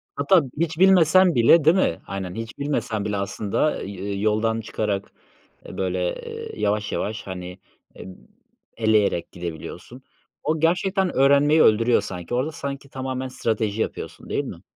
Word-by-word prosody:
Hatta 190 - +4 0.2
hiç 165 0 -1
bilmesen 185 -2 +5
bile 120 +8 +6
değil 160 +3 +6
mi? 185 - +1
Aynen. 95 -2 -5
Hiç 115 0 -7
bilmesen 135 -7 -2
bile 105 -1 -1
aslında, 100 +6 -1
ııı, 100 0 -5
yoldan 110 +2 +1
çıkarak, 105 -2 -3 0.5
ııı, - - -9
böyle, 90 -1 -1
ııı, - - -7
yavaş 105 0 0
yavaş, 105 0 -3
hani, 90 0 -7 0.4
eee, - - -10 0.7
eleyerek 110 -5 +1
gidebiliyorsun. 85 +8 -8 0.4
O 155 +1 0
gerçekten 185 +3 +1
öğrenmeyi 140 +3 +5
öldürüyor 115 +1 +4
sanki. 90 +1 -7
Orada 130 +6 0
sanki 140 -2 -6
tamamen 130 -1 -4
strateji 110 -3 -2
yapıyorsun - - -5
değil - - -1
mi? - - -8
115 Hz, 140 wpm, -23 LUFS, 100-145 Hz, 0.7 s, bile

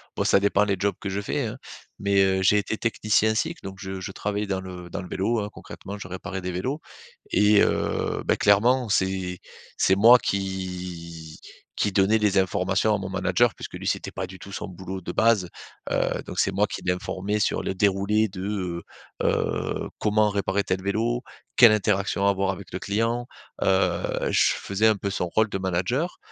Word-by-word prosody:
bon, - - 0
ça - - +4
dépend 100 +1 +3
des 100 -1 +1
jobs 100 +1 0
que 100 - -4
je 100 +1 -2
fais, - - -2
hein, - - -5 0.4
mais 100 -1 +3
heu, 95 0 +2
j'ai 95 +2 +4
été 105 +1 -1
technicien 110 -1 +1
cycles, 110 - -2
donc 95 -1 -7
je 95 -1 -6
je 95 - -5
travaillais 105 +1 -3
dans 95 -1 -1
le 90 -2 -9
dans - - -4
le - - -9
vélo, 110 +6 0
hein, 105 0 -3
concrètement, 100 +1 -9
je 90 - -7
réparais 95 +1 -5
des 90 0 -3
vélos 130 - -3 0.5
et 105 0 +5
heu, - - 0
bah, - - +3
clairement, 115 +4 +3
c'est 95 -2 0 0.4
c'est 95 - +4
moi 115 +5 +8
qui 90 -6 -5 0.4
qui 105 - 0
donnait 100 +3 +4
les 105 -3 +2
informations 95 +3 +1
à - - 0
mon 95 -2 -5
manager - - +2
puisque - - -8
lui - - -6
c'était - - -1
pas 95 -1 -4
du 95 +1 -11
tout 100 - -11
son 100 - -5
boulot 95 +1 -7
de 85 - -6
base, 110 -6 +3 0.4
heu, - - 0
donc - - -5
c'est - - +2
moi 100 +2 +2
qui - - -6
l'informais 95 +3 -2
sur - - +1
le 95 - -3
déroulé 100 +3 +2
de, 95 -3 -4
heu - - -23 0.4
heu, - - -1
comment 105 0 +3
réparer 100 0 0
tel 95 0 -1
vélo, 115 +5 0 0.4
quelle 120 -3 +9
interaction 100 -1 +1
avoir 100 -1 +1
avec 95 -1 -5
le 90 - -3
client, 115 +5 -1 0.3
heu, 95 0 +1
je - - +4
faisais 100 +3 +1
un 110 - +4
peu 100 +1 -3
son 90 -2 -1
rôle 110 +5 +2
de 95 - -3
manager 95 - -1
100 Hz, 195 wpm, -25 LUFS, 95-105 Hz, 0.5 s, quelle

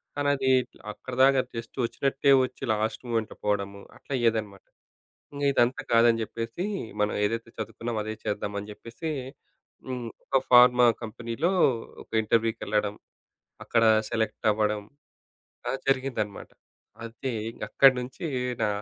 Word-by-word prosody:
కానీ, 145 0 0
అది 135 -1 0 0.4
అక్కడి 125 +4 -8
దాకా 135 -1 +5
జస్ట్ 115 +2 -7
ఒచ్చినట్టే 135 +3 +1
ఒచ్చి, 130 +1 -11
లాస్ట్ 110 +3 -2
మొమెంట్‌లో 115 -2 -2
పోవడము 100 -1 -1 0.2
అట్లా - - -8
అయ్యేదన్నమాట. 110 -5 -1 0.7
ఇంగ 145 0 -3
ఇదంతా 125 -1 +2
కాదని 115 0 +5
జెప్పేసి, 115 - -4 0.4
మనం 105 0 +2
ఏదైతే 115 +2 -2
చదువుకున్నామో 115 +1 -4
అదే 110 +1 -4
చేద్దాం 105 0 -2
అని 105 - -9
జెప్పేసి 115 +9 -7 0.8
హ్మ్. 125 -2 -4 0.2
ఒక 135 - +2
ఫార్మా 125 0 +7 0.2
కంపెనీ‌లో 115 - -2 0.5
ఒక - - -40
ఇంటర్‌వ్యూకెళ్ళడం, 110 -2 0 0.7
అక్కడ 115 -1 +2 0.3
సెలెక్ట్ 110 0 -1
అవ్వడం, 105 0 0 0.9
అలా - - 0
జరిగిందన్నమాట. 130 -6 -1 0.6
అది 120 +2 -5 0.3
అక్కడినుంచి 130 +3 +3 0.4
నా 105 - +3
115 Hz, 120 wpm, -27 LUFS, 110-130 Hz, 0.9 s, ఫార్మా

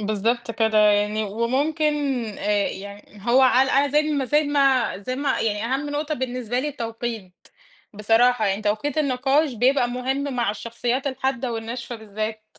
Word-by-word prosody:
بالضبط 215 +3 -1
كده 220 -1 +1
يعني، 210 +1 +3
وممكن 275 +9 0 0.4
آآ 205 -1 +1
يعني 200 +1 -10
هو 260 +2 +5
عل 260 +1 +4
أ 280 +2 +3
زي 295 +2 +3
ما 295 -3 -1
زي 295 +4 +2
ما 275 -6 +2
زي 255 +6 -4
ما 280 +1 0
يعني 210 0 -1
أهم 290 +2 -3
نقطة 300 +1 -2
بالنسبة 250 -2 -3
لي 295 - -2
التوقيت، 230 -7 -6 0.5
بصراحة 225 +2 +3
يعني 200 +2 -1
توقيت 215 +8 -1
النقاش 275 +1 +1
بيبقى 245 +2 +2
مُهم 265 +3 -2
مع 235 -4 +1
الشخصيات 235 +5 -3
الحادة 265 -2 -2
والناشفة 235 +2 -5
بالذات. 215 0 -5
245 Hz, 155 wpm, -23 LUFS, 215-270 Hz, 0.5 s, هو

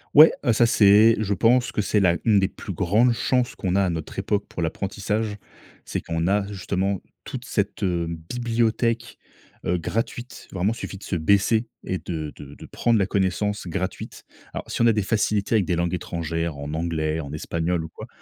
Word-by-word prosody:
Ouais, 155 +2 +10
heu, 120 -4 +3
ça 120 +2 +4
c'est 110 0 +6
je 105 -2 0
pense 120 +5 +3
que 105 - -1
c'est 105 - +2
la 85 -3 +3
une 105 -3 +5
des 95 - +2
plus 100 - -7
grandes 105 +8 +3
chances 125 +1 0
qu'on 95 -2 -1
a 100 - +4
à 90 - +1
notre 80 -2 -6
époque 105 -1 -1
pour 85 - -4
l'apprentissage, 105 +5 -2 0.5
c'est - - -3
qu'on 80 0 -2
a, 100 0 +1
justement, 95 0 -1 0.3
toute - - -6
cette, - - -2
heu, 85 -3 0
bibliothèque, 115 +6 -1 0.5
heu, 90 +1 +1
gratuite, 115 +7 -4
vraiment, 95 +4 0
suffit 100 -4 -6
de - - -14
se 95 - -2
baisser 100 +7 +2 0.2
et 95 - -2
de 80 -3 -5
de 70 0 -10
de - - -11
prendre 115 -2 +1
la 100 - +2
connaissance 100 +1 -1
gratuite. 95 +2 -4 0.3
Alors, - - -6
si - - -2
on 115 - +6
a 115 - +5
des 105 -2 0
facilités 105 0 +1
avec 100 -5 +3
des 90 - 0
langues 85 +1 0
étrangères 85 -3 -3
en 70 +2 -5
anglais, 80 -1 -1
en 70 -3 -6
espagnol 85 +2 -1
ou 80 - -7
quoi, - - -10
100 Hz, 200 wpm, -24 LUFS, 85-110 Hz, 0.5 s, Ouais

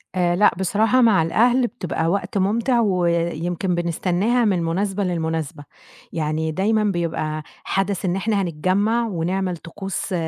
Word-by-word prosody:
آآ 175 -1 +2
لأ 205 +4 +5
بصراحة 220 +7 +2
مع 220 -7 +5
الأهل 240 +9 +3
بتبقى 180 -8 -3
وقت 200 +3 -1
مُمتع 230 +6 +1
ويمكن 175 -2 0
بنستناها 180 +7 0
من 200 -4 +2
المناسبة 190 +4 -1
للمناسبة. 160 -4 -3 0.5
يعني 160 0 -1
دايمًا 210 +6 +1
بيبقى 160 -5 -2 0.2
حدَث 195 -1 -1
إن 180 -1 0
إحنا 200 +1 0
هنتجمّع 195 +7 0
ونعمل 185 -1 -2
طقوس 195 +4 -5
185 Hz, 130 wpm, -22 LUFS, 170-210 Hz, 0.5 s, لأ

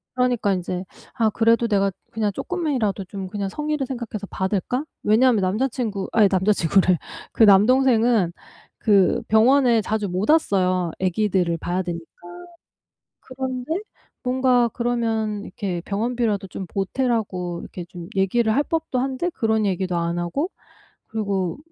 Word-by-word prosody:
그러니까 245 -5 +1
인제 180 0 -3 0.3
아 225 -2 +2
그래도 230 +2 +2
내가 200 -2 +2 0.2
그냥 215 -2 -1
쪼끔이라도 255 - -2
좀 190 0 -6
그냥 200 0 -3
성의를 300 +2 -2
생각해서 235 -5 -5
받을까? 205 +9 -2 0.2
왜냐하면 225 0 +4
남자친구 215 0 -1
아이 210 -3 +5
남자친구래. 185 -2 +3 0.4
그 225 - +4
남동생은 225 -1 +5 0.5
그 200 -5 +3
병원에 235 +1 +4
자주 210 -1 -2
못 185 +7 -2
왔어요, 185 - +2
아기들을 185 -2 +1
봐야 180 +3 -2
되니까. 170 -2 -5 1.1
그런데 260 +2 -4 0.5
뭔가 250 -2 +2
그러면 225 -3 -1
이렇게 180 -3 -4
병원비라도 215 -1 -1
좀 190 +1 -6
보태라고 195 -4 -2
이렇게 180 - -8
좀 175 -1 -10
얘기를 220 +4 +2
할 290 - +3
법도 320 -5 -2
한데 270 +6 -1
그런 220 -4 0
얘기도 185 -2 -1
안 170 +1 -1
하고 275 - -2 0.6
그리고 200 -3 -2
215 Hz, 320 characters per minute, -22 LUFS, 190-245 Hz, 1.1 s, 아이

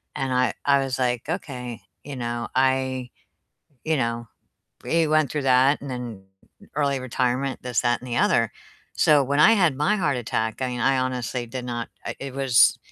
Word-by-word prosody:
And 135 -1 -2
I 125 0 +2
I 140 -1 +4
was, 135 -2 -2
like, 125 -1 -1
"Okay, 125 - -5 0.2
you 140 -1 -6
know, 120 -1 -3
I" 130 -1 +1 0.8
You 160 -1 +1
know, 115 -1 -2 0.6
we 165 -1 +2
went 155 -3 +2
through 150 -2 -1
that 135 +2 +4
and 140 - -6
then 120 -5 -6 0.5
early 140 -2 +1
retirement, 130 +1 -1
this, 125 -2 0
that, 120 -1 +1
and 130 - -8
the 120 - -2
other, 115 -2 +2 0.4
so 145 -2 +4
when 140 +2 +1
I 220 - +7
had 175 -10 +2
my 150 +9 +2
heart 150 -9 0
attack, 115 -1 -2
I 130 - 0
mean, 125 -1 -4
I 135 +2 +3
honestly 125 -1 -2
did 125 +1 -6
not 120 -1 -4 0.2
I - - -3
it 135 -1 -6
was 135 -3 +4
130 Hz, 185 wpm, -24 LUFS, 120-140 Hz, 0.8 s, I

